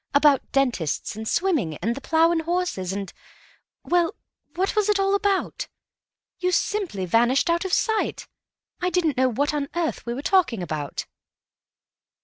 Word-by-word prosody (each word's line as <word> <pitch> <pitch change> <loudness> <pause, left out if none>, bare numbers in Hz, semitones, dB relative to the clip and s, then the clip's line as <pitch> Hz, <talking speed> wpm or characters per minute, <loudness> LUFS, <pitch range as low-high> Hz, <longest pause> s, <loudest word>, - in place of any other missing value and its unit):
—about 285 -2 +5
dentists 240 - 0
and 220 +1 -6
swimming 290 - 0
and 225 +6 -1
the 275 - -8
'Plough 325 +3 +3
and 335 -1 +1
Horses,' 335 - -1
and—well, 330 - -4 0.4
what 380 +5 0
was 425 -1 +2
it 415 -1 +3
all 390 0 +2
about? 400 -1 0 0.7
You 365 0 +1
simply 365 - -1
vanished 240 - +3
out 340 +3 0
of 380 - -3
sight; 440 +2 0 0.5
I 360 - +1
didn't 340 -6 +1
know 260 0 +4
what 285 +5 0
on 285 -1 -2
earth 340 -2 -1
we 235 - -2
were 275 - -5
talking 275 - +2
about." 155 -4 -4
310 Hz, 150 wpm, -24 LUFS, 235-365 Hz, 0.7 s, about